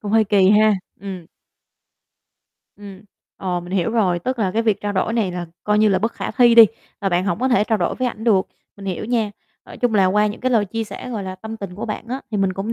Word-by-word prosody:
Cũng 205 0 -5
hơi 225 -1 +5
kỳ 195 -2 +4
ha, 215 +1 +5 0.3
ừm. 185 -4 -7 1.5
Ừm, 200 -1 -11 0.3
ờ, 180 -2 -2
mình 175 +1 -10
hiểu 190 +3 0
rồi, 190 -7 +1
tức 255 +8 -3
là 200 -4 +1
cái 225 +4 0
việc 215 -3 +1
trao 205 0 -2
đổi 200 +3 0
này 210 -6 0
là 175 -1 -5 0.2
coi 210 0 +2
như 215 - +5
là 190 -2 +2
bất 225 +4 -1
khả - - -5
thi 240 -2 +5
đi 230 -1 +10 0.3
và 200 - 0
bạn 180 0 +1
hổng 180 -2 -1
có 260 - +2
thể 245 -4 +3
trao 220 -1 0
đổi 175 - 0
với 255 -1 -1
ảnh 225 -2 -8
được, 200 -5 +3 0.3
mình 195 - -10
hiểu 190 +2 -3
nha. 225 -2 0 0.4
Nói - - -11
chung 245 -3 0
là 195 -3 +4
qua 210 +3 +3
những 210 - -5
cái 255 - 0
lời 225 -4 +3
chia 225 +3 -4
sẻ, 250 +3 -8
gọi 220 -4 -3
là, 185 -1 -5
tâm 220 +4 -8
tình 195 -4 -7
của 200 - -5
bạn 220 +1 -5
á, 260 +3 -3
thì 215 - -2
mình 195 -2 +1
cũng 195 +4 -3
210 Hz, 270 wpm, -20 LUFS, 190-225 Hz, 1.5 s, đi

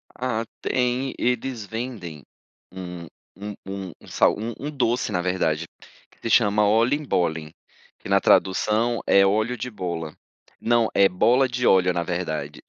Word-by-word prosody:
Ah 120 -3 -2 0.2
tem, 125 +1 0
eles 125 -2 -1
vendem 105 - -6 0.5
um 90 -2 -8 0.3
um 105 +1 -7 0.5
um - - -16
sal - - +3
um 115 +2 -4
um 145 +2 -4
doce 125 -4 0
na 90 - 0
verdade, 85 -3 0 0.4
que - - -27
se 115 - -3
chama 105 -2 +4
Oliebollen, 105 - +1 0.5
que - - -10
na 100 0 +4
tradução 110 +5 +2
é 100 0 +5
óleo 110 +5 +1
de 125 +3 -4
bola. 85 -7 -5 0.4
Não, 115 -1 +2
é 100 0 +6
bola 125 +9 +3
de 125 0 -1
óleo, 90 -1 +4
na 85 - -1
verdade, 80 -4 -4
105 Hz, 145 wpm, -24 LUFS, 90-120 Hz, 0.5 s, é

